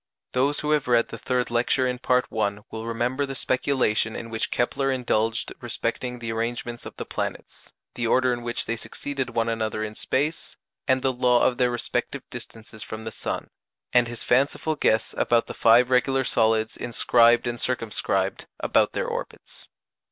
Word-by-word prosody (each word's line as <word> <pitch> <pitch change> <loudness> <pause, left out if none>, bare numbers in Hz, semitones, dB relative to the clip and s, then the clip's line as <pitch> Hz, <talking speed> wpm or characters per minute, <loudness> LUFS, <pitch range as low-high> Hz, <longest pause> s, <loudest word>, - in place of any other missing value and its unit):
Those 140 +3 +1
who 150 - -1
have 150 -4 +2
read 120 -1 +3
the - - -7
third 125 -2 -1
lecture 125 +2 +2
in 125 0 -2
Part 125 -1 +2
I. 100 -2 0
will 110 +1 -6
remember 120 +4 -1
the 135 -1 -4
speculation 125 -5 +1
in 115 -1 -6
which 110 -1 -1
Kepler 135 +3 0
indulged 115 -3 0
respecting 120 +1 -3
the 115 -1 -4
arrangements 120 +1 -3
of - - -11
the - - -6
planets, - - -6 0.2
the 120 -1 -1
order 130 +1 +3
in 120 - -4
which 120 0 -2
they 115 - -1
succeeded 135 +3 -4
one 115 0 +1
another 110 -1 -1
in 110 0 -4
space, 145 +8 -2 0.3
and 130 -1 +3
the 130 - +2
law 125 -1 +3
of 125 0 +2
their 125 -1 +4
respective 120 -1 -2
distances 110 -1 -9
from 110 +2 -6
the 110 - -4
sun; - - -5 0.4
and 120 -1 +5
his 120 0 -6
fanciful 140 +5 +1
guess 110 -6 +1
about 120 -1 +3
the - - -7
five 120 +2 +5
regular 130 +1 +3
solids 110 -2 +2
inscribed 120 0 +3
and 120 -1 -2
circumscribed 115 -4 -1
about - - +2
their - - -1
orbits. - - -7
120 Hz, 175 wpm, -25 LUFS, 115-130 Hz, 0.4 s, and